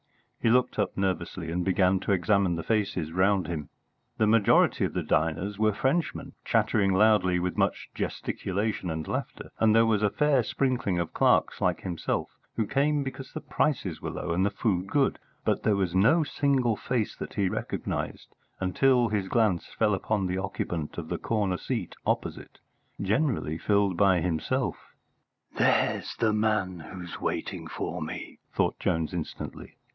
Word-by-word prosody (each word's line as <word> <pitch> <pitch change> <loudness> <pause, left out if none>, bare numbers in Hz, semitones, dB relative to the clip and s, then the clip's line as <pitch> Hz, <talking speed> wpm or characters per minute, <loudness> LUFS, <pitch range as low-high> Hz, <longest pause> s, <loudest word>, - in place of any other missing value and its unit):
He 115 - +2
looked 125 -1 +2
up 105 - -1
nervously 90 -3 -2
and 90 +1 -1
began 95 0 +3
to 100 - -2
examine 95 -1 +2
the 85 - -4
faces 95 -6 -1
round 95 +2 +2
him. 80 -3 -4 0.5
The 110 - +3
majority 110 -1 +4
of - - -1
the - - -1
diners 85 +6 0
were 110 0 +4
Frenchmen, 140 - -1
chattering 105 -3 +2
loudly 95 -3 +4
with 90 0 -2
much - - 0
gesticulation 100 -1 -2
and 80 -1 -4
laughter; - - -4
and 110 -1 +4
there 115 0 +6
was 110 -2 +2
a 105 - +3
fair 145 +2 +3
sprinkling 120 -5 0
of 85 -1 -2
clerks - - +2
like - - +1
himself 90 -3 -2 0.2
who 110 - 0
came 145 +4 +1
because 135 0 -7
the 155 - -6
prices 120 - -1
were - - -3
low - - -4
and 90 +3 +1
the 100 - +3
food 95 -3 -1
good, 140 +4 +1 0.3
but - - +1
there 105 - +2
was 95 -3 0
no 115 - +4
single 135 -6 +1
face 115 0 -2
that - - -7
he 100 -2 +2
recognised - - -4 0.3
until 120 +6 +3
his 105 -2 -1
glance 105 -6 +1
fell 105 - +3
upon 95 +1 0
the 90 +1 -1
occupant 85 -5 -4
of 80 -2 -5
the - - -2
corner 100 -5 0
seat - - -3
opposite, - - -2 0.4
generally 100 - 0
filled 100 -3 +2
by 95 -1 +4
himself. 80 -2 -2 0.6
"There's - - +2
the 110 -2 +1
man 105 -4 0
who's 85 +1 -8
waiting - - -3
for - - -4
me!" - - -6
thought - - 0
Jones 80 -1 0
instantly. 85 -3 -6
100 Hz, 165 wpm, -27 LUFS, 90-115 Hz, 0.6 s, there